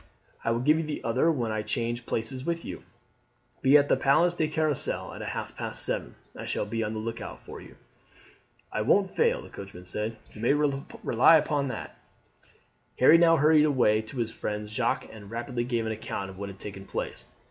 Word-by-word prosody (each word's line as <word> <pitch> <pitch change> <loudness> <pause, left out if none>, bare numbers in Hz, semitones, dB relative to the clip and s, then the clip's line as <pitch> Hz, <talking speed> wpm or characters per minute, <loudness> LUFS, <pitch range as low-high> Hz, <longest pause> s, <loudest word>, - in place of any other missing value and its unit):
I - - 0
will 115 +1 +1
give 150 +4 +4
you - - -1
the 150 -1 -5
other 130 +8 +2
when 120 -7 -1
I 110 0 -1
change 120 +2 -3
places 120 +4 -3
with 170 +2 -2
you. - - -6 0.8
Be 135 +3 +7
at 145 0 +3
the - - +4
Place 170 +6 +3
de 160 -3 0
Carrousel 155 -2 -1
at - - -8
half - - -5
past - - 0
seven. - - -3 0.2
I - - -7
shall - - -1
be 115 +2 -2
on 105 0 -3
the 110 - -3
look 115 +1 -4
out - - -7
for - - -9
you. - - -14 1.0
"I 110 - -1
won't 190 - +3
fail," 470 +1 +1
the - - -12
coachman 95 -2 -10
said; 105 +4 -3 0.2
"you 105 - -10
may 120 +4 +3
rely 140 -1 +3
upon 145 -2 0
that." 130 - -6 1.0
Harry 155 +6 +7
now 165 -1 +6
hurried 150 +1 +5
away 120 -7 +3
to 110 +4 -10
his 115 -2 -1
friend 105 0 -4
Jacques, 105 - -1
and 105 -2 -11
rapidly 120 +2 -3
gave 120 -2 -1
an 110 - -1
account 105 -3 -4
of 95 - -13
what 100 0 -4
had 95 - -10
taken 95 -1 -7
place. - - -5
120 Hz, 205 wpm, -28 LUFS, 110-150 Hz, 1.0 s, Be